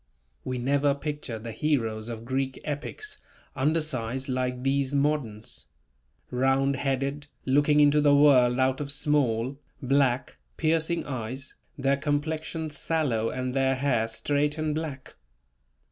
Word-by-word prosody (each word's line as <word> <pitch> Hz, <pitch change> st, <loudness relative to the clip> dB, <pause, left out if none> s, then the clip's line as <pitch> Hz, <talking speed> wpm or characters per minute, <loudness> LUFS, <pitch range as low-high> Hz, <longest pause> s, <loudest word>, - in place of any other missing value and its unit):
We 130 Hz, -, -3 dB
never 140 Hz, +3 st, +2 dB
picture 145 Hz, -5 st, -4 dB
the 115 Hz, +1 st, -7 dB
heroes 115 Hz, -4 st, -1 dB
of 115 Hz, -1 st, -6 dB
Greek 130 Hz, +1 st, -2 dB
epics, 420 Hz, -, -5 dB, 0.4 s
undersized, 135 Hz, -4 st, -1 dB
like 125 Hz, -1 st, -2 dB
these 135 Hz, 0 st, +1 dB
moderns; 140 Hz, -7 st, -1 dB, 0.6 s
round 135 Hz, +2 st, +2 dB
headed, 140 Hz, +1 st, -2 dB, 0.2 s
looking 145 Hz, +2 st, +4 dB
into 145 Hz, 0 st, +5 dB
the 145 Hz, -1 st, +5 dB
world 130 Hz, -4 st, +5 dB
out 130 Hz, +1 st, +2 dB
of 140 Hz, -1 st, -1 dB
small, 135 Hz, -3 st, 0 dB, 0.2 s
black, 130 Hz, -1 st, +1 dB, 0.2 s
piercing 165 Hz, +1 st, +1 dB
eyes, 130 Hz, 0 st, -5 dB, 0.2 s
their 135 Hz, 0 st, +2 dB
complexion 155 Hz, +2 st, -2 dB
sallow 140 Hz, -8 st, 0 dB
and 130 Hz, 0 st, -3 dB
their 135 Hz, 0 st, +2 dB
hair 130 Hz, -4 st, +1 dB
straight 145 Hz, +6 st, 0 dB
and 155 Hz, -1 st, -1 dB
black. 150 Hz, -4 st, -5 dB
135 Hz, 125 wpm, -27 LUFS, 130-150 Hz, 0.6 s, into